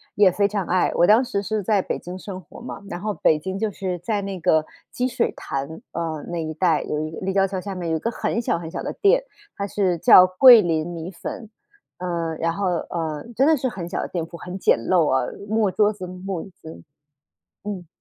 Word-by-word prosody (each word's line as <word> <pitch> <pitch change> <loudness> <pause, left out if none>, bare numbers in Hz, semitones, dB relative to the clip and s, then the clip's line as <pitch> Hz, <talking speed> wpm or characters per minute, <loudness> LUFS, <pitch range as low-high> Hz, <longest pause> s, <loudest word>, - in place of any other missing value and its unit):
也 200 -3 +5
非 200 +2 +2
常 200 -3 -2
爱。 180 0 +2
我 175 - +5
当 220 +5 +6
时 200 -5 -2
是 215 +1 -1
在 200 0 +2
北 - - -3
京 180 +1 -8
生 185 -1 -7
活 175 - -14
嘛， 235 - -7
然 175 - -5
后 210 +2 -2
北 155 - +3
京 190 +4 -5
就 220 - 0
是 180 -2 -4
在 205 +3 -1
那 195 -1 -5
个 160 -2 +2 0.3
积 250 - -1
水 250 -1 0
潭， 140 +4 -5
呃， 160 -2 -3
那 170 -2 -3
一 155 - -4
带 165 -2 +2
有 150 - -3
一 155 0 -3
立 190 +1 -1
交 195 0 +3
桥 190 -1 -4
下 195 0 -6
面 175 -2 -3
有 - - +1
一 - - -6
个 230 - -1
很 230 - -2
小 195 - 0
很 165 -1 -7
小 - - -4
的 - - -3
店， 470 +5 +4 0.3
它 200 - -3
是 190 -3 0
叫 180 - +8
桂 230 +5 +8
林 165 -1 0
米 170 +1 -6
粉， 210 +5 -7 0.5
呃， 170 -2 -2
然 165 0 0
后， 200 +2 -2 0.2
呃， 160 -3 -3
真 265 - +4
的 315 - +5
是 260 -1 -1
很 180 -6 -6
小 - - -3
的 - - -4
店 170 -3 -3
铺， 170 - -12
很 180 +3 -7
简 - - +3
陋 165 +6 +2
啊- 130 -1 +1 0.2
木 215 -1 +2
桌 210 +1 +2
子、 185 -3 -7
木 185 -1 -5
椅 195 - -11
子。 160 - -10 0.8
嗯。 190 -5 -5
185 Hz, 255 characters per minute, -23 LUFS, 165-205 Hz, 0.8 s, 叫